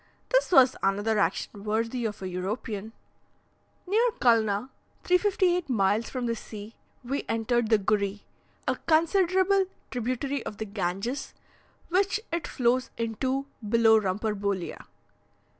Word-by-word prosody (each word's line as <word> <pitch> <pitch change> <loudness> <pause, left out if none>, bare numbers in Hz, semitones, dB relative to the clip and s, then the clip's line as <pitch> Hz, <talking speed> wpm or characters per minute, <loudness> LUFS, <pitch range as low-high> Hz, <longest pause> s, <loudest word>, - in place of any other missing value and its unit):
This - - +2
was 265 -6 +6
another 205 +3 +1
action 200 0 -1
worthy 230 +3 -1
of 210 -3 -4
a - - -2
European! 200 +3 -4 0.9
Near 410 +5 +2 0.2
Culna 225 -1 +3 0.3
(358 360 -3 +2
miles 210 -1 +1
from 255 -2 -3
the 230 - 0
sea), 215 0 -9 0.3
we 275 +4 -2
entered 225 0 +1
the 220 - +5
Gury, 200 0 0 0.5
a - - +1
considerable 375 +4 +3 0.3
tributary 255 +3 -2
of 210 - -6
the 220 - -4
Ganges, 200 +6 -3 0.5
which 385 +3 +2
it 335 -2 -2
flows 250 +1 +1
into 255 +4 -1 0.2
below 225 -1 +5
Rumpurbolea. 200 -1 -2
230 Hz, 120 wpm, -27 LUFS, 210-275 Hz, 0.9 s, was